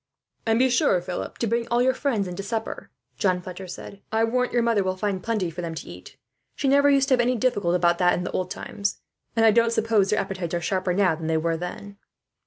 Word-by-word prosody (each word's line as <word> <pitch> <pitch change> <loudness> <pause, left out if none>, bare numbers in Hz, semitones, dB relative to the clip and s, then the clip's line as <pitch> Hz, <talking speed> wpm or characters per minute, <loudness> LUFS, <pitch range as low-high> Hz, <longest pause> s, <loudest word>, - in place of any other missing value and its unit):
"And 225 0 +3
be 260 +2 +4
sure, 235 -7 +3
Philip, 180 0 -5
to - - -1
bring 230 +1 0
all 240 0 +1
your 260 +1 +3
friends 240 -8 -1
in 180 - -6
to - - -3
supper," 220 +2 -4 0.3
John 185 -4 +2
Fletcher 185 +1 -8
said. 200 +3 -9
"I 220 +1 +2
warrant 250 +2 +1
your 240 -1 +2
mother 230 -4 +2
will 185 0 -2
find 195 -1 -2
plenty 215 -7 -1
for 175 +2 -6
them 165 -1 -4
to - - -7
eat. 90 +1 -12 0.4
She 280 - -1
never 280 +1 +5
used 275 -1 +4
to - - +4
have 250 - +4
any 250 +1 +1
difficulty 205 -7 +1
about 175 -1 +2
that, 180 -1 +4
in 180 - -3
the - - -4
old 185 -1 -2
times; 200 +1 -3 0.4
and 225 -1 +4
I 220 - +7
don't 230 +1 +3
suppose 225 -4 +2
their 210 - +2
appetites 185 -3 -3
are - - 0
sharper, 185 0 -1
now, 190 -3 +3
than 160 0 -5
they 160 0 +1
were 165 +1 0
then." 190 +4 -7
200 Hz, 250 wpm, -25 LUFS, 180-230 Hz, 0.4 s, I